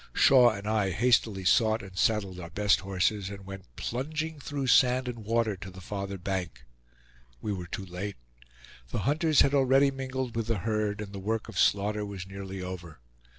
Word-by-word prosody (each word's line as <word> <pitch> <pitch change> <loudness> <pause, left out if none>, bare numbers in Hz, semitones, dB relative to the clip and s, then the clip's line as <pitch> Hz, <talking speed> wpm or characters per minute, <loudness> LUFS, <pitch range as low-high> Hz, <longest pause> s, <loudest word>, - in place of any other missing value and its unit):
Shaw 125 -3 +7
and 100 -2 -5
I 105 -3 +1
hastily 105 -1 +2
sought 110 +2 +3
and 95 -2 -11
saddled 100 -4 +1
our 85 -2 -7
best 100 +4 +2
horses, 95 +1 0
and 100 -1 -9
went 95 -11 -10
plunging 155 - -3
through 140 -1 -4
sand 125 0 +4
and 120 -2 -4
water 115 -1 +1
to 95 +1 -8
the 95 0 -11
farther 100 +1 -5
bank. 90 -7 -4 0.7
We 105 - -3
were 90 -2 -5
too 95 +3 -5
late. 95 +3 -5 0.7
The 100 - -2
hunters 155 +2 +3
had 140 - +3
already 135 0 +4
mingled 130 -2 -4
with 115 -1 -2
the 115 -2 0
herd, 105 +1 -1
and 100 -1 -7
the 100 - -5
work 110 +3 -2
of 110 -5 -5
slaughter 105 +1 +2
was 100 -3 -6
nearly 95 -1 -7
over. 90 -5 -7
105 Hz, 185 wpm, -29 LUFS, 95-120 Hz, 0.7 s, Shaw